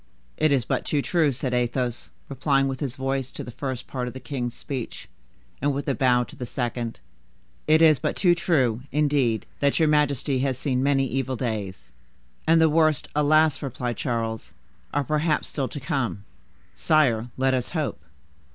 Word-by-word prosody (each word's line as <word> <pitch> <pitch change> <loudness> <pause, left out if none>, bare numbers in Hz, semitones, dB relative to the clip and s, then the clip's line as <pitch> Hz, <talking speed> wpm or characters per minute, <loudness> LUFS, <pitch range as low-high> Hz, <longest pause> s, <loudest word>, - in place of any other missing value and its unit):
"It 155 - +2
is 130 -5 +2
but - - -1
too 145 -2 0
true," 160 -5 +2
said 125 0 -3
Athos, 125 0 -1 0.2
replying 135 0 +1
with 135 -1 -3
his 135 -3 -3
voice 135 -1 -2
to - - -6
the 125 - -8
first 130 0 -4
part 125 -2 -4
of 125 - -7
the - - -5
king's 125 -1 -4
speech, 130 -4 -6 0.5
and 140 0 +1
with 140 - -4
a 140 - +2
bow 125 -2 +3
to - - -12
the 125 - -6
second; 120 -2 -3 0.7
"it 155 +1 +5
is 155 -4 +6
but - - -1
too 175 -3 +4
true, 135 -9 +1
indeed, 140 -6 +1
that 140 -1 +2
your 160 - +4
majesty 145 -3 +2
has 130 -1 0
seen 130 -2 0
many 135 0 +2
evil 135 0 -2
days." 100 - -4 0.6
"And 165 +1 +5
the 160 - +6
worst, 155 -2 +2
alas!" 150 -1 +3
replied 125 -4 -3
Charles, 115 -2 -3 0.4
"are 145 - 0
perhaps 155 +3 0
still 135 -3 -2
to 145 - -6
come." 130 - -2 0.5
"Sire, 125 -8 +2
let 130 0 +2
us 125 -2 -1
hope." 155 - -2
135 Hz, 180 wpm, -25 LUFS, 125-150 Hz, 0.7 s, is